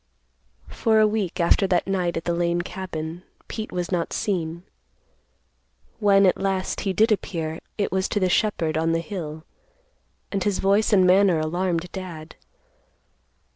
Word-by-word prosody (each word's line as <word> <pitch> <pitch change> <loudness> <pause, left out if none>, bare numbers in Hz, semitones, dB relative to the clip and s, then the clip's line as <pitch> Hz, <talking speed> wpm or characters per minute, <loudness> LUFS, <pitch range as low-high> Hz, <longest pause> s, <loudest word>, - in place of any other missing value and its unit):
For 220 -1 +2
a 215 - +6
week 210 -4 -1
after 175 +3 +3
that 180 -2 +1
night 180 -3 -1
at 165 - -5
the 170 - 0
Lane 170 0 0
cabin, 170 -3 -6 0.3
Pete 220 -1 -5
was 180 0 -3
not 175 -2 -1
seen. 170 -4 -2 1.4
When 200 -2 +5
at 185 - +3
last, 195 -1 -1
he 195 - -1
did 220 +4 +3
appear, 165 -6 -2 0.2
it 205 - -1
was 190 0 0
to 205 - 0
the 185 - +2
shepherd 170 -5 +1
on 165 +1 +1
the 165 - +1
hill, 160 -3 -6 0.9
and 195 -2 -1
his 205 -1 0
voice 200 +3 +2
and 190 -3 +5
manner 185 -2 +5
alarmed 175 +2 -1
Dad. 170 -5 -8
185 Hz, 155 wpm, -24 LUFS, 170-195 Hz, 1.4 s, a